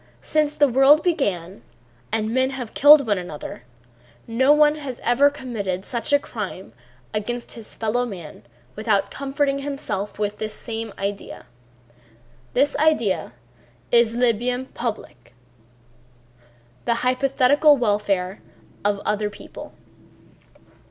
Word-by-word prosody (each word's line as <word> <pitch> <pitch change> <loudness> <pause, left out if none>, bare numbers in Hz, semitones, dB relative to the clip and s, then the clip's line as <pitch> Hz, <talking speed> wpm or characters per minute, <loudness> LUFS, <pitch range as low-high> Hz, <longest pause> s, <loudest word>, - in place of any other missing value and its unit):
Since 305 -1 +1
the 290 - +4
world 270 +4 +5
began 195 - -1 0.5
and 220 0 -1
men 260 +1 +2
have 255 -4 -6
killed 290 0 +7
one 205 -4 +1
another 150 -8 -8 0.6
no 260 +5 +3
one 300 0 +5
has 280 -5 -7
ever 255 +4 +4
committed 215 -10 -4
such 240 +3 -3
a 285 - +6
crime 210 -8 -7 0.4
against 240 +3 -3
his 230 -2 -10
fellow 225 +2 0
man 180 - -8 0.3
without 205 -2 0
comforting 275 0 -1
himself 275 -8 -4
with 210 0 -2
this 215 0 -4
same 225 -2 -5
idea. 200 -6 -5 1.1
This 285 +3 +2
idea 230 - +1 0.6
is 235 -1 +4
le 245 -1 +3
bien 245 +3 -2
public, 165 - -6 1.5
the 235 - +2
hypothetical 275 +3 +4
welfare 205 -4 0 0.4
of 205 0 +1
other 210 0 0
people. 210 - -11
235 Hz, 120 wpm, -22 LUFS, 205-275 Hz, 1.5 s, killed